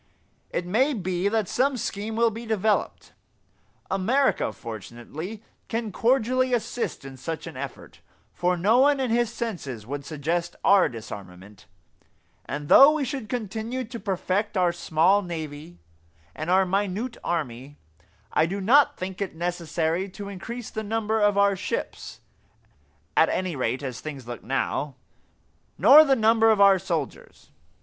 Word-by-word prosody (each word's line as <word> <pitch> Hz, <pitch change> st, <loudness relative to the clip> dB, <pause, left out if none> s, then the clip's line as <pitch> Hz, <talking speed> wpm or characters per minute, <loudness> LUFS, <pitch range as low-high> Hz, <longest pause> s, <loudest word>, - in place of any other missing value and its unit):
It 175 Hz, -, -3 dB
may 255 Hz, +10 st, +2 dB
be 185 Hz, -2 st, -1 dB
that 215 Hz, -1 st, 0 dB
some 265 Hz, +5 st, +1 dB
scheme 215 Hz, 0 st, -4 dB
will 230 Hz, 0 st, +3 dB
be 230 Hz, +2 st, -8 dB
developed. 215 Hz, -1 st, -1 dB, 0.8 s
America, 235 Hz, +9 st, +1 dB
fortunately, 120 Hz, -, -8 dB, 0.2 s
can 225 Hz, -1 st, -3 dB
cordially 255 Hz, +3 st, +2 dB
assist 235 Hz, -, -4 dB
in 135 Hz, -1 st, -9 dB
such 160 Hz, +5 st, -5 dB
an 165 Hz, -4 st, -8 dB
effort, 135 Hz, 0 st, -8 dB, 0.3 s
for 180 Hz, 0 st, 0 dB
no 210 Hz, +8 st, +3 dB
one 285 Hz, +1 st, +4 dB
in 255 Hz, -3 st, -1 dB
his 235 Hz, 0 st, +1 dB
senses 145 Hz, -, -5 dB
would 140 Hz, +3 st, -5 dB
suggest 165 Hz, +4 st, -3 dB
our 200 Hz, -2 st, +5 dB
disarmament; 100 Hz, -4 st, -10 dB, 0.8 s
and 145 Hz, +1 st, -5 dB
though 275 Hz, -, +9 dB
we 305 Hz, -3 st, -1 dB
should 255 Hz, -3 st, -5 dB
continue 230 Hz, +2 st, -3 dB
to 235 Hz, 0 st, -8 dB
perfect 200 Hz, +1 st, -1 dB
our 180 Hz, -1 st, +3 dB
small 170 Hz, +3 st, +2 dB
navy 160 Hz, -2 st, -7 dB, 0.6 s
and 155 Hz, +2 st, -5 dB
our 190 Hz, +1 st, +4 dB
minute 200 Hz, +5 st, -1 dB
army, 145 Hz, -4 st, -4 dB, 0.6 s
I 160 Hz, -, +3 dB
do 195 Hz, +4 st, -3 dB
not 260 Hz, +9 st, +4 dB
think 185 Hz, +1 st, -6 dB
it 190 Hz, -4 st, -3 dB
necessary 170 Hz, +1 st, -2 dB
to 200 Hz, +2 st, -8 dB
increase 230 Hz, +5 st, -7 dB
the 220 Hz, -, -4 dB
number 220 Hz, 0 st, -1 dB
of 205 Hz, -1 st, +3 dB
our 200 Hz, 0 st, +4 dB
ships 460 Hz, -, -5 dB, 0.9 s
at -, -, +5 dB
any 185 Hz, -3 st, -2 dB
rate 130 Hz, +1 st, -2 dB
as 130 Hz, -3 st, -5 dB
things 140 Hz, -6 st, -8 dB
look 120 Hz, -, -7 dB
now 135 Hz, +2 st, -2 dB, 0.8 s
nor 300 Hz, +3 st, +9 dB
the 275 Hz, -3 st, +3 dB
number 225 Hz, -1 st, +4 dB
of 215 Hz, -2 st, +3 dB
our 200 Hz, -1 st, +6 dB
soldiers. 170 Hz, -6 st, -5 dB
190 Hz, 145 wpm, -25 LUFS, 160-225 Hz, 0.9 s, though